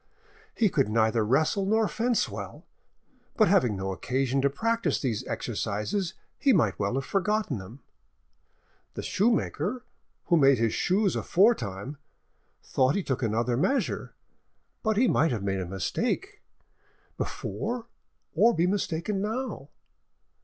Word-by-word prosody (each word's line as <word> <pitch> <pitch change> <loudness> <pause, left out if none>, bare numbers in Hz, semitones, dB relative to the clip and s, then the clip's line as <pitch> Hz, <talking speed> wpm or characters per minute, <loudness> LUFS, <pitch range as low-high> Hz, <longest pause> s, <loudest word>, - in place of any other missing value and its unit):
He 225 - +3
could 140 - +1
neither 110 +1 +2
wrestle 155 - +2
nor 220 +1 +3
fence 235 +2 0
well, - - -8 0.7
but 215 - +5
having 170 - +3
no 95 0 -3
occasion 130 +6 -1
to 140 - +3
practise 230 +10 0
these 120 -6 -2
exercises 165 - -2 0.2
he 275 - +4
might 105 - +2
well 100 +4 0
have 135 -1 -2
forgotten 205 - 0
them. 110 +8 -11 1.1
The - - -5
shoemaker—who 225 -3 -1
made 135 -3 +5
his 115 -1 +1
shoes 195 +1 +1
afore 205 +7 +4
time, 100 - -6 0.7
thought 130 +2 +1
he 200 - 0
took 130 -5 -2
another 115 +1 0
measure, 265 - -1 0.7
but 220 -3 0
he 250 +3 +4
might 165 -6 +3
have 110 -5 -2
made 95 -1 -1
a 90 - -4
mistake 240 - -2 0.7
before 240 -1 -4 0.5
or 225 +8 +4
be 170 +1 +2
mistaken 190 0 -1
now. 215 - -4
160 Hz, 130 wpm, -27 LUFS, -, 1.1 s, but